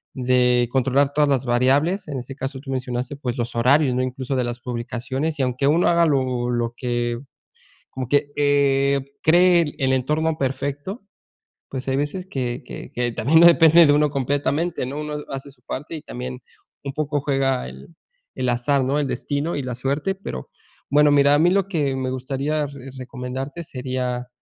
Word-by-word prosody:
de 125 -1 +3
controlar 135 +2 +2
todas 150 -1 +3
las 135 -2 +1
variables. 140 +10 +2
En 140 - -4
ese 125 +2 -7
caso, 135 0 -5
tú 135 -1 -8
mencionaste, 125 +1 -3
pues 125 -4 -4
los 120 0 -3
horarios, 130 +3 +4
¿no? 125 - +1
Incluso 130 +1 -3
de 125 - +1
las 120 0 -4
publicaciones. 125 +5 -3
Y - - +2
aunque 130 +2 0
uno 160 +4 +3
haga 170 0 +4
lo 130 -4 0
lo 120 -1 -1
que 120 -1 -2 0.7
como 130 -2 -5
que, 145 0 +1
eh, 140 -1 +2
cree 170 -1 +4
el 135 -3 +1
entorno 155 +5 0
perfecto, 145 - -3 0.7
pues 130 0 -5
hay 135 0 +1
veces 145 +6 -2
que 130 -5 -3
que - - -9
que 120 -1 -1
también 150 +10 +4
no 170 - +8
depende 165 0 +7
de 145 - +5
uno 150 0 +3
completamente, 145 +3 -1
¿no? 145 +3 -4
Uno 150 0 -4
hace 135 +1 -6
su 125 -2 -20
parte 150 +7 -6
y 155 - -6
también 125 +1 -7 0.4
un 140 - -5
poco 145 -1 -1
juega 135 - 0
el 65 +1 -11 0.5
el 125 - -1
azar, 130 +3 +1
¿no? 135 +3 0
El 145 - 0
destino 145 +5 -2
y 145 - -2
la 125 -1 -4
suerte. 140 +9 -1
Pero 185 - -7 0.4
bueno, 145 +1 +5
mira, 140 0 +5
a - - +3
mí 175 +3 +4
lo 195 0 +2
que 145 -8 -1
me 130 -1 -2
gustaría 140 +4 -2
re 135 -1 -10
recomendarte 130 +5 -6
sería, 125 -4 -3
135 Hz, 185 wpm, -22 LUFS, 125-150 Hz, 0.7 s, no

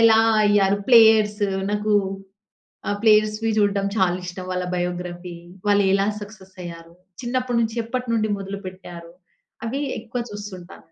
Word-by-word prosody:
ఎలా 225 -1 +6 0.3
అయ్యారు 200 -1 +3
ప్లేయర్స్? 220 -3 +6 0.3
నాకు 210 +1 0 1.0
ఆహ్, 205 - -1
ప్లేయర్స్‌వి 215 0 +3
చూడ్డం 200 -1 +2
చాలా 180 -2 +3
ఇష్టం. 180 +1 -7
వాళ్ళ 180 0 -1
బయోగ్రఫీ, 175 0 -4 0.3
వాళ్ళు 205 0 +4
ఎలా 195 +1 +2
సక్సెస్ 200 -2 -12
అయ్యారు? 170 -1 -9 0.3
చిన్నప్పటి 245 0 -1
నుంచి 225 0 -1
ఎప్పట్నుండి 230 -3 -1
మొదలుపెట్టారు? 185 -3 -8 0.5
అవి 270 +5 -2 0.2
ఎక్కువ 235 +2 -5
చూస్తుంటా. 200 -4 -9
205 Hz, 120 wpm, -22 LUFS, 185-220 Hz, 1.0 s, ఎలా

